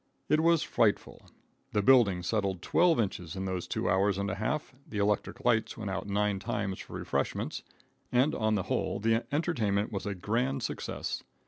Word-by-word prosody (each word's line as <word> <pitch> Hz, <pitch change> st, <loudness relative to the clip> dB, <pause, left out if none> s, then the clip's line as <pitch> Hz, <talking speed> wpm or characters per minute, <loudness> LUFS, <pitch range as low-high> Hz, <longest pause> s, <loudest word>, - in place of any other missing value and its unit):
It 155 Hz, -, +4 dB
was 165 Hz, 0 st, +4 dB
frightful. 105 Hz, -3 st, +1 dB, 0.5 s
The 105 Hz, -, +2 dB
building 100 Hz, -7 st, +5 dB
settled 95 Hz, -1 st, -1 dB
twelve 170 Hz, -4 st, +3 dB
inches 90 Hz, -6 st, -2 dB
in 95 Hz, 0 st, -3 dB
those 95 Hz, -2 st, -3 dB
two -, -, -2 dB
hours 95 Hz, +1 st, +2 dB
and 100 Hz, 0 st, -1 dB
a -, -, -2 dB
half, 110 Hz, +9 st, -2 dB, 0.2 s
the 105 Hz, -, -5 dB
electric 105 Hz, +5 st, 0 dB
lights 115 Hz, -1 st, +2 dB
went 105 Hz, -4 st, -4 dB
out 95 Hz, -, -3 dB
nine 100 Hz, 0 st, 0 dB
times 100 Hz, -1 st, -3 dB
for -, -, -10 dB
refreshments, -, -, -2 dB, 0.5 s
and, 130 Hz, +5 st, +3 dB
on 110 Hz, -1 st, +1 dB
the 95 Hz, -, 0 dB
whole, -, -, -1 dB
the 115 Hz, +2 st, +1 dB
entertainment 115 Hz, -10 st, 0 dB
was 100 Hz, -1 st, -4 dB
a 100 Hz, -, -2 dB
grand 120 Hz, +8 st, -1 dB
success. -, -, -3 dB
105 Hz, 180 wpm, -30 LUFS, 100-120 Hz, 0.5 s, building